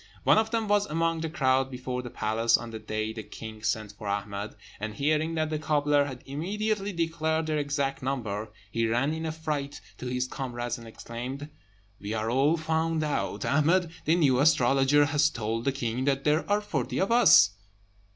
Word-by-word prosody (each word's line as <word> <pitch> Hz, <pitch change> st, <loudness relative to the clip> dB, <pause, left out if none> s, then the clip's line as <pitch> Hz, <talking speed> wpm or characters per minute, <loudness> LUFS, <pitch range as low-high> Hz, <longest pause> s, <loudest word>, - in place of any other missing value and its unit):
One -, -, +5 dB
of 220 Hz, 0 st, 0 dB
them 225 Hz, -1 st, -1 dB
was 205 Hz, 0 st, +2 dB
among 165 Hz, 0 st, 0 dB
the 160 Hz, -, -2 dB
crowd 130 Hz, -4 st, +2 dB
before 125 Hz, -1 st, -4 dB
the 125 Hz, -, -7 dB
palace 115 Hz, +1 st, +2 dB
on 120 Hz, -1 st, -8 dB
the 110 Hz, -, -6 dB
day 110 Hz, 0 st, -3 dB
the 110 Hz, -, -6 dB
king 110 Hz, 0 st, -9 dB
sent 110 Hz, -2 st, -1 dB
for 105 Hz, 0 st, -9 dB
Ahmed; 100 Hz, +1 st, -3 dB, 0.2 s
and 110 Hz, +1 st, -4 dB
hearing 155 Hz, +4 st, +1 dB
that 155 Hz, -1 st, -1 dB
the 155 Hz, -, -1 dB
cobbler 145 Hz, -1 st, +2 dB
had 130 Hz, -3 st, -7 dB
immediately 200 Hz, +8 st, -2 dB
declared 160 Hz, -2 st, -1 dB
their 155 Hz, -1 st, 0 dB
exact 140 Hz, -1 st, -1 dB
number, 110 Hz, -6 st, -3 dB, 0.2 s
he 115 Hz, +2 st, +1 dB
ran 120 Hz, +7 st, +1 dB
in 160 Hz, 0 st, -3 dB
a -, -, -1 dB
fright 150 Hz, -3 st, -4 dB, 0.2 s
to 125 Hz, -, -5 dB
his 125 Hz, 0 st, -1 dB
comrades, 120 Hz, -3 st, -4 dB
and 115 Hz, -, -11 dB
exclaimed, 125 Hz, +6 st, -7 dB, 0.5 s
"We 105 Hz, +2 st, -4 dB
are 110 Hz, +1 st, -1 dB
all 140 Hz, +6 st, +3 dB
found 160 Hz, 0 st, 0 dB
out! 150 Hz, -1 st, -2 dB
Ahmed, 165 Hz, +4 st, +2 dB
the 160 Hz, -, +4 dB
new 140 Hz, -7 st, +3 dB
astrologer, 140 Hz, -1 st, +4 dB
has 145 Hz, 0 st, +3 dB
told 115 Hz, -3 st, -3 dB
the 140 Hz, -, +3 dB
king 125 Hz, -1 st, -2 dB
that 135 Hz, -1 st, +1 dB
there 150 Hz, +4 st, +1 dB
are 205 Hz, +1 st, +3 dB
forty 210 Hz, -, -2 dB
of 195 Hz, -, +1 dB
us." 105 Hz, -, +7 dB
140 Hz, 190 wpm, -28 LUFS, 115-160 Hz, 0.5 s, us